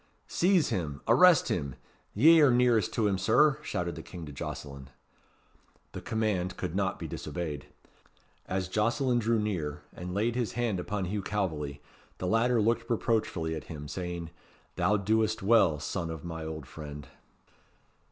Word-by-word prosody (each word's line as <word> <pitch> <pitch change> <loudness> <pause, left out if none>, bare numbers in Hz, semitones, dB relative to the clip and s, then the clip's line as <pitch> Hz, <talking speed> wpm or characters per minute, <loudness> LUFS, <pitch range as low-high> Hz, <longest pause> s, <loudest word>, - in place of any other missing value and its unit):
"Seize 180 -2 +2
him! 75 -6 -2
arrest 160 +8 +6
him! 70 -6 -2 0.4
ye 160 +9 +7
are 145 - +7
nearest 120 -5 +3
to 115 - +1
him, 100 -2 +1
Sir," 145 +7 +4
shouted 90 - -3
the 80 - -7
king 85 0 -9
to 75 - -8
Jocelyn. 70 -1 -7 1.0
The - - -7
command 110 -7 -1
could - - -4
not - - 0
be - - -6
disobeyed. 80 -5 -5 0.8
As 95 0 -2
Jocelyn 120 +6 +1
drew 115 0 +1
near, 80 -9 -2
and 90 +1 -6
laid 110 +3 +1
his 120 -2 -2
hand 115 -5 -1
upon 95 +1 -3
Hugh 100 +3 -2
Calveley, 80 -9 -3 0.4
the - - -4
latter 115 +4 +2
looked 115 +2 +1
reproachfully 105 -8 0
at 80 - -6
him, 75 -3 -8
saying, 85 -1 -5 0.4
"Thou 90 +4 +2
doest 110 +1 +1
well, 100 -8 +4
son 85 +3 -3
of 80 -1 -7
my 80 -1 -5
old 80 -3 -6
friend." 75 0 -9
95 Hz, 155 wpm, -29 LUFS, 80-115 Hz, 1.0 s, ye